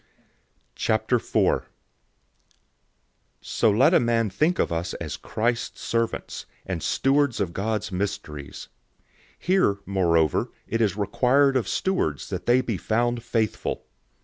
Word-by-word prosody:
004:001 110 +2 +1 1.7
So 115 - +1
let 110 +6 +4
a - - +6
man 115 -3 +1
think 155 - +1
of - - 0
us 85 +1 -2
as - - -5
Christ's 120 +2 -2
servants, 115 0 -2 0.2
and 90 -4 -3
stewards 140 - +1
of 90 -4 -1
God's 110 +1 -2
mysteries. 90 -7 -5 0.3
004:002 - - -42 0.3
Here, 180 - +2
moreover, 85 -5 +2 0.2
it 115 - -1
is 105 -3 +1
required 130 +7 +3
of 130 - +1
stewards, 180 - -1
that - - -4
they 125 +2 +5
be 115 -6 -2
found 120 +5 0
faithful. 115 -2 -2
110 Hz, 120 wpm, -25 LUFS, 95-125 Hz, 1.7 s, a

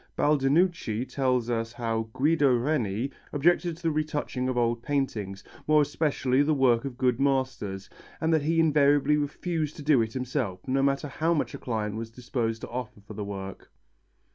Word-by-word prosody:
Baldinucci 145 - +2
tells 130 -2 0
us 115 -1 -2
how 115 -2 -2
Guido 145 0 +3
Reni 120 -3 -1 0.2
objected 170 +3 +2
to 170 - -18
the 165 - +2
retouching 150 -4 -2
of 130 - -2
old 120 -1 +1
paintings, 115 -9 -2 0.2
more 155 -1 +5
especially 140 -3 +1
the 150 +1 +2
work 125 -3 +3
of 130 -3 -5
good 125 -1 +1
masters, 130 -8 -1 0.3
and 160 0 +1
that 160 - +3
he 165 +3 +1
invariably 145 -2 +4
refused 150 +1 -2
to 150 - -8
do 145 -4 +4
it 110 0 -2
himself, 125 -8 -3
no 135 +1 +1
matter 140 +1 +1
how 160 +4 0
much 150 - -1
a - - -7
client 110 -3 -3
was 115 0 -5
disposed 115 -1 -3
to - - -7
offer 125 -3 -6
for 100 - -11
the 105 - -5
work. 100 -1 -7
130 Hz, 175 wpm, -27 LUFS, 115-150 Hz, 0.3 s, more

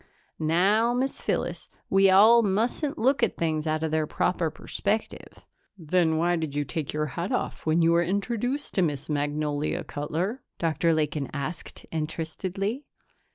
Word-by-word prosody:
"Now, 200 +9 +3
Miss 265 +2 -1
Phyllis, - - -2 0.2
we 195 0 +5
all 215 +5 +7
mustn't 235 +9 0
look 265 +2 +2
at 230 - +1
things 160 -1 -1
out 155 0 0
of 160 - -1
their 155 -1 +1
proper 170 0 0
perspective." 210 +7 -4 0.3
"Then 165 -1 +1
why 175 +2 +2
did 160 -3 -4
you 145 - +1
take 145 +1 -4
your 150 0 -1
hat 170 +6 -4
off - - -3
when 160 +2 +3
you 165 - +4
were 170 0 +4
introduced 235 +9 -2
to 190 - +2
Miss 150 -3 -1
Magnolia, 145 0 -1
Cutler?" 170 - -3 0.2
Dr. 165 0 +1
Lakin 150 -2 -1
asked 145 +4 -5
interestedly. 180 - -3
170 Hz, 155 wpm, -26 LUFS, 155-205 Hz, 0.3 s, all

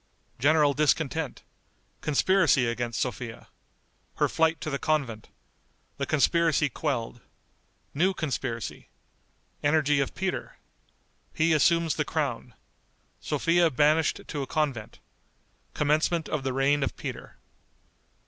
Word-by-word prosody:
General 145 +2 +4
Discontent. 155 0 0 0.6
Conspiracy 155 -2 +3
against 120 -1 -2
Sophia. 120 -1 -4 0.7
Her - - +2
Flight 160 -1 +1
to 155 - -4
the 140 - -2
Convent. 135 -8 -1 0.7
The 140 - -2
Conspiracy 155 0 +2
Quelled. 120 -4 -3 0.7
New 185 +6 +1
Conspiracy. 130 - -4 0.7
Energy 145 -1 +2
of 140 - -2
Peter. 190 0 -3 0.8
He 160 +1 +3
Assumes 165 +2 +3
the 150 - +1
Crown. 135 -7 -3 0.6
Sophia 170 0 +2
Banished 155 +3 +2
to 145 - -4
a 135 - -4
Convent. 135 -9 -2 0.8
Commencement 155 +2 +1
of 150 - -2
the 135 - -1
Reign 135 +2 +2
of 135 - -2
Peter. - - -7
150 Hz, 110 wpm, -27 LUFS, 130-160 Hz, 0.8 s, General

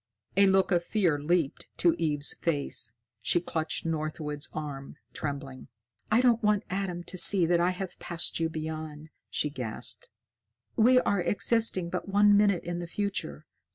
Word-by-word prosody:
A 200 +1 +6
look 190 0 +3
of 175 -1 +2
fear 175 -7 +1
leaped 160 -1 0
to 170 -2 +4
Eve's 150 -3 +1
face. 140 -8 -1 0.3
She 175 - +2
clutched 160 -2 -3
Northwood's 155 -2 -3
arm, 145 -3 -6 0.2
trembling. 140 -3 -6 0.4
"I 225 +3 +5
don't 240 -2 +3
want 210 -2 +2
Adam 185 -2 -3
to 185 - -5
see 185 -2 +6
that 170 +1 +2
I 175 +1 +3
have 185 0 -5
passed 170 -1 -2
you 165 0 0
beyond," 155 -1 -6 0.2
she 150 - -1
gasped. 125 -6 -3 0.7
"We 250 +3 +5
are 200 -6 +1
existing 205 -4 +1
but 185 +2 -4
one 205 +1 +5
minute 200 -3 +3
in 175 0 -4
the 175 - -5
future. 180 - -4
170 Hz, 155 wpm, -28 LUFS, 150-195 Hz, 0.7 s, A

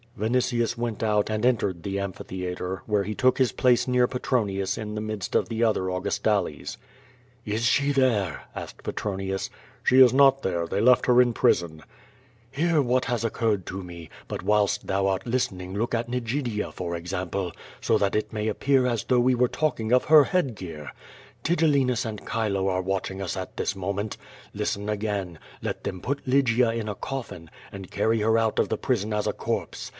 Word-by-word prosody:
Vinitius 120 +1 +1
went 115 -2 -3
out 105 -2 +1
and 110 +1 -1
entered 100 -8 +1
the 100 0 -2
amphitheatre, 95 -1 -4
where 105 -2 +1
he 105 +2 -4
took 130 +3 +3
his 130 -4 +2
place 125 +3 +3
near 125 -1 +3
Petronius 100 -7 -1
in 105 -1 -5
the 105 - -3
midst 110 -3 -4
of - - +2
the 115 0 -1
other 105 -5 +1
Au 90 0 -2
gustales. 100 -5 -1 0.7
"Is 110 +2 -2
she 140 +4 +3
there 120 - +1
?'* - - -30
asked - - -8
Petronius. 95 -1 -3 0.3
"She 130 +1 +6
is 125 -2 +8
not 135 0 +5
there, 85 -5 -1
they 100 - -1
left 125 +2 +5
her 125 0 +6
in 120 -1 +2
prison." 85 -6 +1 0.7
"Hear 160 +2 +2
what 125 -1 +1
has 120 -3 -1
occurred 110 -4 0
to 95 +1 -5
me, 85 -2 -10 0.2
but - - -5
whilst 105 0 +2
thou 95 0 +1
art 95 -1 -1
listen 115 -6 -1
ing 90 +1 -7
look 115 +3 -1
at 115 +1 -2
Nigidia, 120 -2 -2
for 85 -1 -4
example, 90 +1 -3 0.3
st> - - +2
that 100 -1 +1
it 110 - -1
may 105 0 -2
appear 130 +4 +2
as 120 -3 -1
though 125 -1 +3
we 125 +1 +4
were 125 +1 +3
talking 120 -6 -1
of 125 - +4
her 150 -2 +7
hoadgoar. 95 - -2 0.5
Tigellinus 140 -8 +2
and 110 -2 -5
Chilo 100 -4 0
are 95 -1 +1
watching 95 0 -3
us 95 0 -3
at 95 -1 -6
this - - -2
moment. 100 +2 -3 0.4
Listen 100 +1 -2
again; 100 -5 -3 0.2
let - - -4
them 95 - -4
put 140 0 -3
Lygia 125 -3 +3
in 115 -2 -3
a 105 - -3
coffin 115 - -6 0.2
and 95 -2 -9
carry 110 +2 +1
her 110 +1 +3
out 115 -1 +1
of - - +2
the - - -1
prison 110 -5 -1
as 105 0 0
a - - 0
corpse. - - -4
110 Hz, 190 wpm, -26 LUFS, 95-125 Hz, 0.7 s, is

